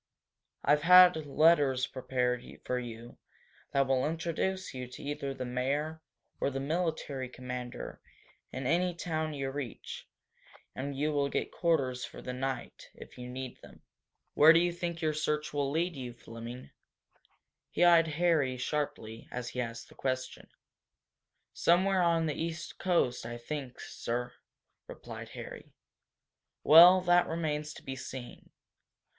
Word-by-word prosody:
I - - +3
have 150 0 +4
had 180 -2 +7
letters 140 -4 +4
prepared 125 -1 -1 0.2
for 125 - -1
you 120 -1 -9 0.5
that 140 0 +3
will 130 -1 +1
introduce 170 +3 -2
you 125 -1 -5
to 125 - -11
either 140 -1 -3
the 130 -1 -5
mayor 140 +6 -2 0.4
or - - +1
the 135 -1 -4
military 150 -3 -2
commander 125 -1 -7 0.5
in 130 0 -5
any 175 +5 +1
town 155 -3 -2
you 135 -1 -3
reach 135 -4 -6 0.7
and 140 +1 -4
you 150 +2 +1
will 140 -1 +1
get - - -2
quarters 135 -7 0
for - - -8
the 125 - -5
night, 130 -1 -5
if - - -13
you 125 0 -7
need 130 0 -7
them. - - -15 0.5
Where 155 +2 +8
do 165 - +6
you 175 0 +1
think 170 -1 -4
your 155 -1 +2
search 150 0 -1
will 140 -1 0
lead 165 +4 -1
you, 125 -3 -6
Fleming?" 120 +2 -9 1.0
He - - +1
eyed 170 -1 +6
Harry 155 -7 +2
sharply 125 -5 -3
as 125 -1 -4
he 125 +1 -3
asked 115 -1 -6
the - - -17
question. 130 -1 -3 1.1
"Somewhere 185 +2 +3
on 165 -1 +3
the 155 - -1
East 165 +2 -5
coast, 170 -10 +1
I 120 +1 -6
think, 130 +1 -6
sir," 120 +1 -4 0.5
replied - - -9
Harry. - - -9 0.9
"Well, 175 +4 +9
that 175 0 +4
remains 150 -2 -2
to - - -12
be 135 - -5
seen. 130 -1 -9
140 Hz, 145 wpm, -31 LUFS, 125-165 Hz, 1.1 s, Well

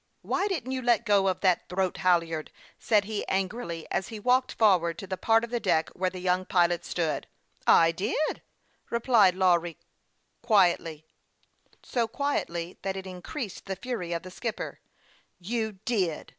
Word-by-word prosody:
" - - -46
Why 390 - 0
didn't 285 - -3
you 260 -1 -2
let 235 -1 +2
go 200 -3 +4
that 185 -1 +1
throat 185 0 -1
halyard? 170 -4 +1 0.2
" - - -33
said 210 -3 +5
he, 210 0 -3
angrily, 190 -3 -2
as 190 - -1
he 220 - -7
walked 250 +4 +2
forward 175 -6 +3
to - - -7
the 190 0 -3
part 225 +4 +3
of 235 - -5
the 240 - 0
deck 165 -7 +1
where 185 0 -1
the 185 - -9
young 180 0 +1
pilot 175 -2 +2
stood. 160 -5 -2 0.3
" - - -33 0.2
I 165 - +4
did," 215 - -1 0.5
replied 230 -6 +4
Lawry, 175 -3 +2 0.6
quietly 175 -8 +2 0.8
so 235 -2 -1
quietly 180 -10 -3
that 195 0 -3
it 190 - -6
increased 190 - -7
the 190 - -2
fury 195 -4 -4
of 170 +1 -2
the 185 - -9
skipper. 230 +4 -5 0.3
" - - -35
You 220 -2 -1
did 190 -10 -1
190 Hz, 170 wpm, -28 LUFS, 175-230 Hz, 0.8 s, said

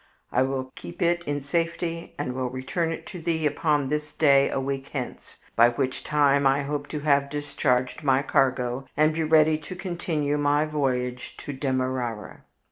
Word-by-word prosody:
I 125 - +2
will 130 0 -1
keep 85 - -10
it 175 0 +2
in 145 0 -1
safety 165 +2 -2
and 145 -3 -3
will 130 -1 -2
return 130 +7 -2
it 165 - -6
to 180 -4 -8
thee 160 -1 -1
upon 150 -2 +1
this 150 0 -2
day 140 -3 +4
a - - -1
week 135 0 -3
hence, 130 -4 -6 0.2
by 115 +1 +7
which 130 +2 -2
time 140 -2 +3
I 135 +1 +2
hope 145 0 -3
to 150 - -5
have 140 -2 +2
discharged 140 -3 -1
my 135 -2 +3
cargo 130 -1 +1
and 155 +1 +4
be 165 - -1
ready 155 0 +4
to 160 +4 -8
continue 170 -5 -2
my 145 +1 +2
voyage 125 -5 -2
to 145 - -4
Demerara." 130 -4 -2
145 Hz, 175 wpm, -26 LUFS, 130-155 Hz, 0.2 s, by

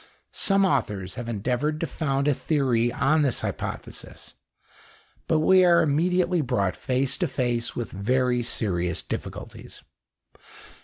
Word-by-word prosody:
Some 195 0 +3
authors 105 - -1
have 120 +2 -6
endeavoured 125 +8 -1
to - - +1
found 140 -2 -1
a 145 - +4
theory 130 -6 +1
on 155 +5 +2
this 135 -4 +1
hypothesis, - - -6 0.9
but 160 -1 +2
we 185 +3 +5
are 170 -2 +5
immediately 175 +3 +1
brought 115 -9 0
face 130 0 -1
to - - +1
face 120 -2 -1
with 120 -3 -4
very 125 +5 +1
serious 90 -7 -1
difficulties. - - -7
130 Hz, 125 wpm, -25 LUFS, 115-155 Hz, 0.9 s, we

